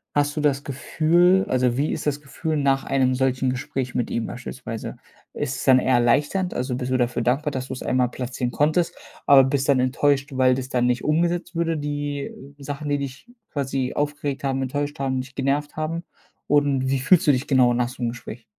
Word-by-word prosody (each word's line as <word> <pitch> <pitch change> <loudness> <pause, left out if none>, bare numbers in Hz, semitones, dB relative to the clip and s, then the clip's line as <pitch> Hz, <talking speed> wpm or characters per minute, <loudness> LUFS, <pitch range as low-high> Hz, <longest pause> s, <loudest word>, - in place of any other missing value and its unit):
hast 145 +1 +1
du 155 - -1
das 140 -2 +1
Gefühl 170 +7 +2
also, 125 -1 +1
wie 145 +3 +1
ist - - -4
das 145 -1 0
Gefühl 155 +2 -3
nach 135 -1 +2
einem 130 -1 +1
solchen 130 0 +1
Gespräch 125 0 -4
mit 125 -2 -1
ihm 115 - -1
beispielsweise? 125 -2 -7 0.4
Ist 135 -3 -3
es - - -5
dann 130 -1 +6
eher 130 0 +1
erleichternd 145 +10 +2
also, 125 0 -2
bist 125 0 -3
du 130 - +3
dafür 120 -1 0
dankbar, 135 +6 +1
dass 130 -1 -4
du - - -3
es - - -7
einmal 125 -1 +1
platzieren 125 -1 -4
konntest, 155 +5 +1 0.3
aber 135 -1 +8
bist 135 0 0
dann 135 -2 +4
enttäuscht, 135 +2 +1
weil 130 -1 +4
das 130 0 -4
dann 125 -1 +1
nicht 125 0 0
umgesetzt 170 +3 0
würde, 165 -1 0
die, 145 -1 -3 0.4
äh, - - -11
Sachen, 145 +1 -5
die 145 - +2
dich 140 - -7 0.2
quasi 135 -2 -2
aufgeregt 145 -1 -2
haben, 135 -1 0
enttäuscht 145 +3 -3
haben, 130 -1 -1
dich 130 +1 -12
genervt 140 +3 -1
haben? 160 +2 -2 0.4
Und 140 -2 +2
wie 135 -1 +1
fühlst 175 +6 +4
du - - +8
dich 130 0 -1
genau 125 -3 +4
nach 120 0 +1
so 125 0 -8
'nem 120 - +1
Gespräch? 120 -1 -9
135 Hz, 210 wpm, -23 LUFS, 130-145 Hz, 0.4 s, aber